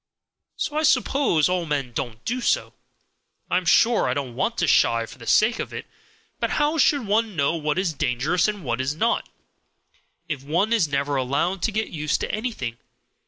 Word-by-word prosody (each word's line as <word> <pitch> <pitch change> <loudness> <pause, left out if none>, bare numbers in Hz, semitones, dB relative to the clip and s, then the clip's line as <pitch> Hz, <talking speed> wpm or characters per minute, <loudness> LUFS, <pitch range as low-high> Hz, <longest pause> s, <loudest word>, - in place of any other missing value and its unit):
So 295 - -3
I - - +2
suppose 270 - +2
all 180 -2 -1
men 140 -4 -2
don't 120 -3 -5
do 250 +2 -2
so. - - 0 0.8
I - - +3
am 180 - -2
sure 230 - +4
I 125 - 0
don't 135 -4 -4
want - - -1
to - - +1
shy 115 0 +3
for 120 - -14
the 115 - -11
sake 220 +2 +3
of - - -4
it; - - -6 0.5
but - - 0
how 300 +2 +1
should 280 -3 +3
one 215 0 0
know 140 0 +1
what 155 -1 -1
is 185 -3 0
dangerous 140 - 0
and 210 -3 -4
what 120 -1 -1
is 135 +3 -2
not, 230 +8 0 1.0
if 150 -5 -4
one 175 +11 0
is 210 -9 +3
never 140 0 -1
allowed 140 +8 -1
to 225 - 0
get 215 +1 -2
used 150 -2 -1
to - - -2
anything? 210 - -4
165 Hz, 195 wpm, -23 LUFS, 140-220 Hz, 1.0 s, sure